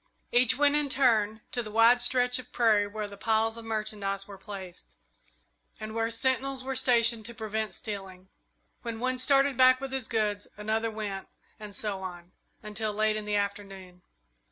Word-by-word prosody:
Each 245 0 +4
went 290 0 +4
in 295 -1 +1
turn 220 -5 +2
to 245 - -1
the 215 - -7
wide 230 +3 +5
stretch 250 0 +3
of 255 - -11
prairie 215 -4 +3
where 210 0 -5
the 200 0 -11
piles 225 +1 +1
of 230 -1 -8
merchandise 210 -3 -3
were 200 - -9
placed, 190 -4 -9 0.8
and 215 0 -6
where 225 0 0
sentinels 260 +3 0
were 265 0 -3
stationed 235 -3 +3
to 235 - -10
prevent 220 -1 -3
stealing. 190 -3 -7 0.5
When 230 -2 -5
one 255 +1 -1
started 275 0 +3
back 255 0 +7
with 270 0 -6
his 265 -3 -3
goods, 210 -2 -1
another 220 +2 -1
went, 210 -3 -5 0.3
and 210 -2 -8
so 200 -2 -2
on, 175 -1 -8 0.3
until 215 0 -3
late 215 +1 +1
in 215 -1 -4
the 210 0 -1
afternoon. 195 -3 -4
220 Hz, 175 wpm, -28 LUFS, 205-245 Hz, 0.8 s, back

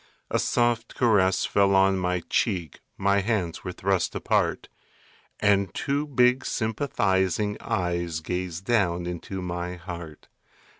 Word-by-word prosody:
A - - +2
soft 120 -1 0
caress 95 -6 +3
fell 100 -1 +3
on 95 0 +4
my 90 -1 -1
cheek, 90 - -1 0.2
My 100 +1 +2
hands 100 -5 -1
were 90 - -4
thrust 95 0 0
apart. - - 0 0.7
And 100 -3 +3
two 145 +2 -1
big 125 -2 +3
sympathizing 105 -4 0
eyes 85 -2 -1
Gazed 90 +1 -4
down 90 -7 +1
into 90 +2 -5
my 90 0 -4
heart. 85 -3 -9
95 Hz, 120 wpm, -26 LUFS, 90-105 Hz, 0.7 s, on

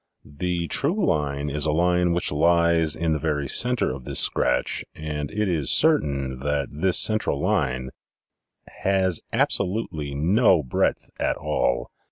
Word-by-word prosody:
The 85 +3 -3
true 175 - +1
line 70 - -1
is 75 +1 0
a - - +2
line 90 +2 +1
which 85 0 0
lies 85 0 +2
in 80 -1 -1
the 75 - -2
very 75 -3 -2
center 125 - +2
of 65 -1 -9
this - - -2
scratch 65 0 0
and 75 -2 -5
it 105 0 -2
is 80 -6 -1
certain 70 - +2
that 70 0 -2
this 90 +6 +1
central 110 -9 +2
line 70 -9 -1 0.8
has 95 -3 0
absolutely 90 -8 -1
no 90 - +3
breadth 65 - -1
at - - -1
all." - - -1
80 Hz, 145 wpm, -23 LUFS, 70-90 Hz, 0.8 s, no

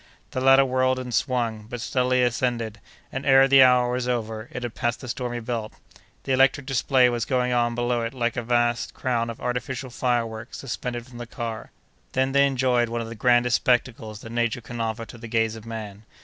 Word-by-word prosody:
The 130 - -3
latter 135 +1 +6
whirled 130 0 +1
and 125 -1 -5
swung, 115 -5 -1
but 120 - -5
steadily 125 +1 +1
ascended, 115 -3 -1 0.3
and, 135 - -4
ere 135 0 +6
the 135 0 +7
hour 125 -1 +5
was 125 0 -2
over, 115 -2 -3
it 125 - -6
had 120 -2 -4
passed 120 -1 -1
the 130 - -8
stormy 120 -1 -3
belt. 115 -2 -4 0.5
The 135 - -3
electric 135 +1 +3
display 130 0 +3
was 120 -2 -1
going 125 0 0
on 120 -1 +1
below 120 0 0
it 115 +3 -4
like 120 -2 -1
a 120 - -1
vast 120 0 0
crown 120 -3 -1
of 115 - -7
artificial 125 +1 -3
fireworks 120 -1 -2
suspended 120 -2 -5
from 120 -2 -12
the 120 - -6
car. 115 -2 -6 0.4
Then 130 +1 +1
they 140 +1 +4
enjoyed 125 -3 +1
one 115 0 -2
of 115 - -6
the - - -6
grandest 120 0 +3
spectacles 115 -3 -1
that 115 - -9
Nature 120 0 -1
can 120 0 -6
offer 115 0 -3
to 120 - -12
the 115 - -8
gaze 115 -1 0
of 110 0 -11
man. 110 -2 -7
120 Hz, 205 wpm, -24 LUFS, 115-130 Hz, 0.5 s, the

